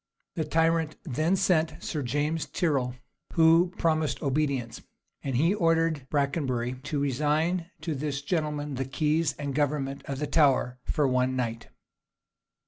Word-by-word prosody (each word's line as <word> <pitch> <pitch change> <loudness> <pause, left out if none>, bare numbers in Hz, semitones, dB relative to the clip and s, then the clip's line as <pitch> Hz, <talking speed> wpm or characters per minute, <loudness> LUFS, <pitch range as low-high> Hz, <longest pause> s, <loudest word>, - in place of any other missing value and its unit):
The 160 -3 -2
tyrant 165 0 +1
then 155 +4 +1
sent 165 -4 +2
for - - -15
Sir 150 - -3
James 150 +4 -1
Tyrrel, 135 -8 0 0.4
who 165 +2 +5
promised 160 -1 0
obedience: 135 -5 -1 0.4
and 135 -2 -2
he 165 +8 +3
ordered 165 -6 +1
Brakenbury 130 -4 -1
to 145 0 -1
resign 155 +6 0
to 160 0 -2
this 140 -1 -3
gentleman 150 -2 -2
the 135 0 -2
keys 150 +4 +1
and 145 -1 -4
government 140 -1 -1
of 140 - -4
the 150 - -2
Tower 135 -4 +2
for 150 -3 +1
one 130 0 +1
night. 115 -2 -3
150 Hz, 140 wpm, -27 LUFS, 135-160 Hz, 0.4 s, who